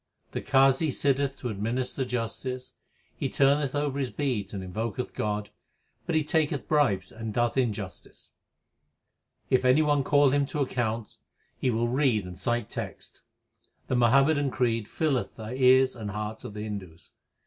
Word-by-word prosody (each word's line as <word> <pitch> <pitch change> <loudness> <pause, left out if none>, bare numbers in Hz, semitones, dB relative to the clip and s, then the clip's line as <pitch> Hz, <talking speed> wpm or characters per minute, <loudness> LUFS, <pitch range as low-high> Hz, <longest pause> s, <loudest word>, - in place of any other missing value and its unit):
The - - -3
Qazi 135 +2 +4
sitteth 140 0 0
to 125 - -2
administer 120 +6 -2
justice; 125 +1 -4 0.4
He - - -2
turneth 140 0 +2
over 145 -1 -1
his 130 -3 -1
beads 120 -10 -2
and 100 -2 -5
invoketh 110 +5 -4
God, 105 0 -2 0.6
But 170 - 0
he 155 - +3
taketh 150 -2 0
bribes 110 -12 +2
and 110 -1 -6
doeth 120 0 +1
injustice. 110 -7 -3 1.2
If 130 - +4
any 130 +5 +5
one 145 -2 +2
call 145 0 +4
him 140 0 +2
to 145 +2 -4
account, 115 -5 -2 0.4
he 130 - -1
will 115 0 +1
read 125 -5 +2
and 90 -1 -8
cite 120 +2 0
texts. - - -7 0.7
The 130 - +1
Muhammadan 135 +4 +4
creed 115 -4 0
nlleth 145 -3 -1
the 110 +1 -7
ears 130 0 +5
and 110 -3 -5
hearts 105 +2 -5
of 115 -5 -8
the 105 - -5
Hindus. 95 -6 -7
125 Hz, 155 wpm, -27 LUFS, 110-140 Hz, 1.2 s, any